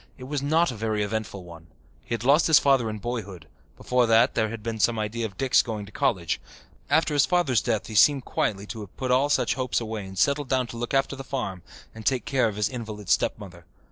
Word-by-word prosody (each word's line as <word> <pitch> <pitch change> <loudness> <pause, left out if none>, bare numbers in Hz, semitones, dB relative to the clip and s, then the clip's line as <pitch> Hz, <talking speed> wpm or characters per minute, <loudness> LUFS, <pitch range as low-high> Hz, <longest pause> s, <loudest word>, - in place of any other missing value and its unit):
It 130 - -10
was 140 +1 -3
not 155 +2 +2
a - - -7
very 110 -1 -1
eventful 105 -3 -4
one. 85 -1 -13 0.4
He 120 - -3
had 115 - -6
lost 145 +5 +4
his 160 -3 +7
father 135 -5 +3
in 110 - -4
boyhood; 100 -7 -5 0.3
before 125 -1 +1
that 115 0 +4
there 110 -1 0
had 110 -1 -7
been 115 -1 -4
some 115 +2 +2
idea 110 +2 -2
of 100 - -17
Dick's 135 -1 +4
going 110 -4 -5
to 100 - -14
college. 85 -5 -1 0.5
After 160 -1 +2
his 145 -2 +3
father's 150 - +2
death 115 -2 -1
he 110 - -8
seemed 135 +4 +5
quietly 100 -1 -1
to 110 - -7
have 100 -3 -11
put 130 -1 -2
all 135 +3 +3
such - - +2
hopes 130 -2 -1
away 110 -3 -5
and 95 0 -10
settled 140 +4 +1
down 130 -1 +1
to - - -7
look 120 +3 -3
after 135 0 +1
the 135 - -8
farm 100 -9 -4 0.3
and 110 - -10
take 130 +2 0
care 130 -4 +2
of 105 - -4
his 105 0 +1
invalid 110 -5 -7
stepmother. 90 -4 -1
115 Hz, 235 wpm, -25 LUFS, 105-130 Hz, 0.5 s, his